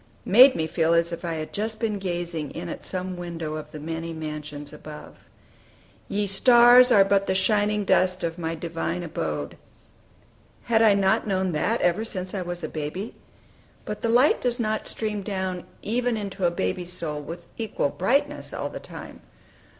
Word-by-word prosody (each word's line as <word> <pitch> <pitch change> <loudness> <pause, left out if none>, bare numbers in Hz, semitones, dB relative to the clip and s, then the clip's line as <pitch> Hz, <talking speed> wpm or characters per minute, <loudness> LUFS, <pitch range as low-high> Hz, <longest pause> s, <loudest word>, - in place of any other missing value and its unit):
made 255 +7 +8
me 160 - 0
feel 165 +1 +1
as 170 0 +4
if 170 - -6
I 170 -1 -2
had 155 -1 -6
just 215 +1 -3
been 215 -3 -1
gazing 175 -5 -3
in 170 +1 -5
at - - -6
some 185 -1 -4
window 170 -3 -5
of 155 0 -6
the 155 - -8
"many 165 +2 -5
mansions" 150 -2 -6
above: 150 0 -10 0.9
"Ye 205 +1 0
stars 240 +5 +7
are 200 -4 +7
but 195 0 +2
the 190 - +1
shining 210 +1 +2
dust 185 -1 +2
Of 165 +1 -3
my 165 0 -2
divine 170 +1 -3
abode 75 - -4 0.5
" - - -32
Had 225 -1 +5
I 215 -3 +6
not 195 +1 +2
known 190 -2 0
that, 210 +9 0
ever 175 +5 +2
since 185 -4 -5
I 195 - -2
was 175 -1 -5
a - - -1
baby? 160 +8 -5 0.7
But 210 - -5
the 230 - 0
light 245 +5 +4
does 245 0 -1
not 215 -1 -1
stream 215 -2 -3
down 190 -3 -3 0.2
even 240 +1 0
into 195 -3 -3
a - - +3
baby's 170 - -2
soul 155 -4 -2
with 170 +4 -8
equal 215 -10 -1
brightness 285 - 0
all - - -3
the - - -7
time. - - -10
185 Hz, 180 wpm, -25 LUFS, 165-210 Hz, 0.9 s, made